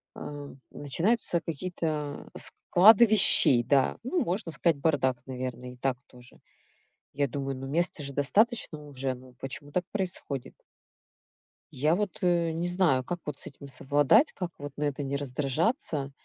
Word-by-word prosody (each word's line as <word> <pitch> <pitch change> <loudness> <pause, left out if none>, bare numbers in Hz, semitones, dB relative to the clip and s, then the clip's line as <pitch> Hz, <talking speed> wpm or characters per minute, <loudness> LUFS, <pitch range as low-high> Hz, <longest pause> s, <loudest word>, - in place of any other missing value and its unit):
э, 145 -1 -8 0.2
начинаются 170 - -1
какие-то, 155 -3 -4
э, - - -6
склады 220 +6 +5
вещей. 190 - +8
Да, 135 +2 +1
ну, 335 +6 -1
можно 175 -1 -3
сказать 165 -2 +1
бардак, 135 -4 0
наверное, 125 -1 -6
и - - -17
так 130 -1 -1
тоже. 125 -1 -18 0.8
Я 140 -1 0
думаю, 135 0 -4
ну, 135 +1 -7
места 170 0 -1
же 140 0 -6
достаточно 155 - 0
уже, 135 -2 -3
ну 125 0 -16
почему 145 +2 -6
так 180 -1 -1
происходит? 180 -9 -4 1.2
Я 150 +6 +1
вот, 205 -1 -3
э, 170 -2 +2
не 170 +2 -2
знаю, 175 -8 +1
как 175 +6 -5
вот 150 -2 -5
с - - -8
этим 140 0 -11
совладать, 145 - +2
как 180 -2 -5
вот 145 0 -8
на 150 - -3
это 145 -1 -2
не 140 +1 -3
раздражаться, 145 - -2
145 Hz, 155 wpm, -27 LUFS, 135-175 Hz, 1.2 s, вещей